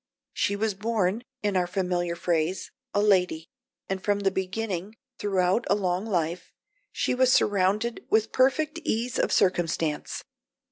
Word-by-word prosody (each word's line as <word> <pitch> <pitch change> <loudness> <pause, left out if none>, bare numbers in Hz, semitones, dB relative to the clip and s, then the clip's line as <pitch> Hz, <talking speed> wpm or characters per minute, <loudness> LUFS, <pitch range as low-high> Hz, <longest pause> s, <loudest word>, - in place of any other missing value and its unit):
She 200 - 0
was 215 +1 0
born, 210 0 0 0.2
in 205 -2 0
our 180 -1 +2
familiar 180 -2 -1
phrase, 170 +1 -1 0.2
a 205 - +1
lady, 180 -5 +2 0.4
and 190 -1 -3
from 205 -1 +1
the 195 -1 +2
beginning, 190 +1 -3 0.2
throughout 190 +2 +1
a 200 - +5
long 185 +1 -1
life, 175 -3 -2 0.4
she - - 0
was 255 0 +4
surrounded 205 +2 +2
with 220 0 +2
perfect 285 +4 +2
ease 235 +3 -1
of - - +1
circumstance. 165 -4 0
195 Hz, 140 wpm, -27 LUFS, 180-220 Hz, 0.4 s, a